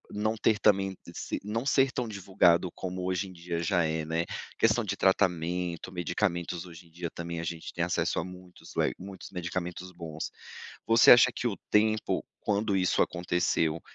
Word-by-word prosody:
não 110 +2 0
ter 110 0 +2
também, 95 -2 +3 0.2
se - - -4
não 115 +5 -2
ser 135 -2 +3
tão 125 -3 -2
divulgado 90 -3 +3
como 90 0 -4
hoje 95 +1 -1
em 95 - -11
dia 85 -1 -4
já 85 0 +2
é, 80 0 -1
né, 80 +1 -1 0.3
questão 115 +1 +3
de 100 -1 -2
tratamento, 90 -2 +1
medicamentos 85 -1 -1
hoje 85 0 -12
em - - -24
dia 85 0 -5
também 85 0 -5
a 85 - -4
gente 85 -1 -5
tem - - -1
acesso - - 0
a - - -1
muitos, 90 0 -12
le - - +1
muitos 95 0 -9
medicamentos 90 0 -4
bons. 80 -2 -6 0.6
Você 115 0 +6
acha 125 +1 +8
que 120 - -1
o 100 - -3
tempo 110 0 +2 0.2
quando 105 0 0
isso 90 -1 +2
aconteceu 85 -2 0
90 Hz, 175 wpm, -29 LUFS, 85-105 Hz, 0.6 s, acha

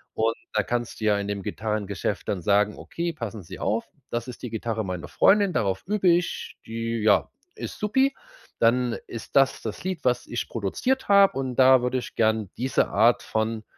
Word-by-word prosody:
Und 115 +1 +1 0.2
da - - +2
kannst 120 -1 -3
du - - -1
ja 105 -1 +4
in 100 - -3
dem 100 -1 -3
Gitarrengeschäft 105 -2 -3
dann 95 - -1
sagen: 105 +2 +2
„Okay, 170 0 -4
passen 115 - -6
Sie 80 - -10
auf. 110 +2 0 0.3
Das 120 +2 -2
ist 125 - -9
die 125 - -4
Gitarre 110 -1 -2
meiner 90 -2 -5
Freundin. 200 -1 +4
Darauf 95 -8 0
übe 200 -2 +2
ich. 175 0 0
Die, 115 0 -3
ja, 105 -3 +4 0.3
ist - - -7
supi. 265 +6 +2 0.5
Dann 120 +1 +2
ist 115 - -9
das 135 -1 +3
das 110 -2 -6
Lied, 185 -3 -3
was 125 -1 +1
ich 120 - -3
produziert 120 - -1
habe. 200 -6 +6
Und 130 -2 -3
da 130 -1 +7
würde 125 +1 0
ich - - -9
gern 110 -3 +1
diese 130 +2 +1
Art 115 +4 +3
von 110 0 -2
115 Hz, 190 wpm, -25 LUFS, 105-130 Hz, 0.5 s, da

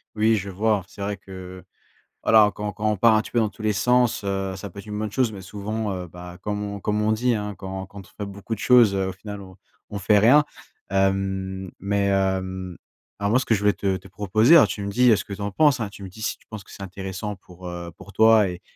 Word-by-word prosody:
Oui, 110 +1 +3
je 100 0 -4
vois, 105 +1 +1
c'est 100 - -12
vrai 100 +1 -2
que 95 -1 -10 0.6
voilà, 110 -2 +5
quand 105 0 -4
quand 110 0 -1
on 105 - -1
part 115 +3 +5
un 110 - +3
petit - - -11
peu 120 - +2
dans 110 - +2
tous 105 - -11
les 110 0 +1
sens, 125 +2 +2
heu, 95 -1 -2
ça 100 +1 -7
peut 100 - -11
être 100 - -10
une 105 -1 -5
bonne 110 -1 -3
chose, 125 0 +1
mais 100 -2 -8
souvent, 105 +3 -4
heu, 90 -1 -5
bah, 90 +1 -10
comme 105 -1 -3
on 100 0 -5
comme 105 +1 0
on 110 +1 +2
dit, 120 +3 +1
hein: 105 -2 -3
«quand 95 0 -6
quand 100 +1 -11
on 105 - -9
fait - - -3
beaucoup 100 +3 -6
de 110 - -5
choses, 120 -5 +5
heu, 95 -1 0
au 95 - -4
final, 105 +2 -8
on 95 -1 -12 0.3
on 100 - -5
fait 105 +2 +4
rien». 130 +8 +6 0.5
Hem, 95 -1 -1
mais, 100 +1 0
hem, 95 -2 -1 0.4
alors, 100 0 0
moi, 125 - +4
ce 130 - -3
que - - +2
je - - -1
voulais 105 0 +4
te 95 -1 -1
te 95 - -14
proposer 110 - +4
alors, 150 - +6
tu 100 - -5
me 100 - -3
dis, 125 +3 +5
heu, - - +6
ce - - -3
que - - -13
tu 100 - -7
en 100 0 -2
penses, 145 +4 +3
hein, 110 - -2
tu 100 - -12
me 95 - -7
dis 110 +4 -13
si - - -2
tu - - -28
penses 110 -3 -8
que - - -16
c'est 100 - -9
intéressant 95 +2 -5
pour, 90 -1 -15
heu, 85 -1 -6
pour 95 +1 -13
toi 110 -1 +5
et 90 +1 -7
100 Hz, 275 wpm, -24 LUFS, 95-110 Hz, 0.6 s, rien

